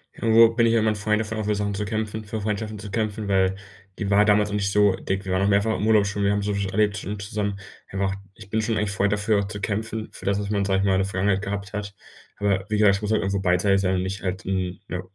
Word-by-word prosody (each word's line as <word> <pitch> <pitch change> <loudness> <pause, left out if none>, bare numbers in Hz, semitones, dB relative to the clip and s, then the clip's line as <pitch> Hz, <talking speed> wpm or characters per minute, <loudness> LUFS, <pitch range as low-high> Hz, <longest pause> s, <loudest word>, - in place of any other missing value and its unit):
Irgendwo 115 0 +6
bin 115 0 +2
ich 115 - +2
ja 115 - +4
immer 110 0 +2
'n - - -2
Freund 105 +1 0
davon, 110 0 -4
auch 110 - -2
für 105 0 +1
Sachen 100 0 -2
zu 105 +1 -3
kämpfen, 110 0 -3
für 110 +1 -5
Freundschaften 105 +1 -3
zu 105 -1 -8
kämpfen, 110 0 -2
weil 95 -1 +2 0.4
die 100 -3 -3
war 105 +1 +5
damals 105 0 +3
noch 105 - -3
nicht 100 -1 0
so 105 -1 +4
dick. 95 +1 -3
Wir 95 - -3
waren 95 - +1
auch 100 - +2
mehrfach 100 +2 +2
im 110 - -1
Urlaub 105 -2 +5
schon, 100 0 -2
wir 100 - +3
haben 100 0 0
soviel 100 -1 -1
schon 95 - -2
erlebt 105 0 +1
schon 100 +1 -5
zusammen 100 -1 -3 0.3
wir 95 - -5
haben 100 - +2
auch - - -5 0.2
ich 100 -2 -13
bin 110 +1 0
schon 110 -1 -1
eigentlich 105 -1 0
Freund, 100 0 +1
dafür 105 0 +1
auch 100 - -2
zu 105 0 -6
kämpfen, 110 +2 -3
für - - -12
das, 100 0 +1
was 100 0 -4
man, 100 -1 +1
sage 95 -1 +1
ich 100 - 0
mal, 95 - +3
in 95 - +2
der 95 - +1
Vergangenheit 95 0 0
gehabt 100 0 -5
hat. 100 -1 -5 0.4
Aber 100 -2 0
wie 105 - 0
gesagt, 105 -2 +5
es - - -10
muss 105 0 -2
halt 110 - +2
auch - - -3
irgendwo 100 0 0
beidseitig 95 +2 +2
sein 95 0 +1
und 90 - 0
nicht 95 +1 -4
halt 95 0 -4
'n, 95 -1 -2
ja, 90 - -4
100 Hz, 310 wpm, -24 LUFS, 100-105 Hz, 0.4 s, Irgendwo